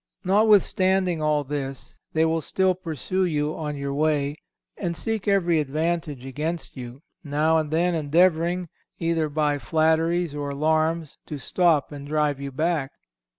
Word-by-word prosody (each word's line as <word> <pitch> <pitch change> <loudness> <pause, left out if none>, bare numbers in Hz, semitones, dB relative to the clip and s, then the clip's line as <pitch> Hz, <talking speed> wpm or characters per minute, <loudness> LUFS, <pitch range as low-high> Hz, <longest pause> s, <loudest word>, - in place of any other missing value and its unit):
Notwithstanding 190 -3 +3
all 150 -1 +2
this, 135 -1 -5 0.2
they 160 0 +3
will 160 0 +1
still 190 +3 +1
pursue 180 +1 -2
you 150 -3 0
on 150 -2 -4
your 140 0 -3
way 145 -1 0 0.4
and 170 -3 -3
seek 220 -3 -3
every 175 -5 +3
advantage 150 -2 -2
against 155 +5 -4
you, 125 +2 -9 0.2
now 155 +2 +2
and 155 -1 -3
then 170 +3 +1
endeavouring, 170 +3 +2 0.3
either 165 -2 0
by 145 -1 0
flatteries 160 +1 +1
or 145 -1 -3
alarms, 155 +2 0
to 150 - -5
stop 160 +1 +2
and 145 -1 -8
drive 150 -2 0
you 140 0 -5
back. 155 -1 -1
155 Hz, 145 wpm, -24 LUFS, 145-175 Hz, 0.4 s, Notwithstanding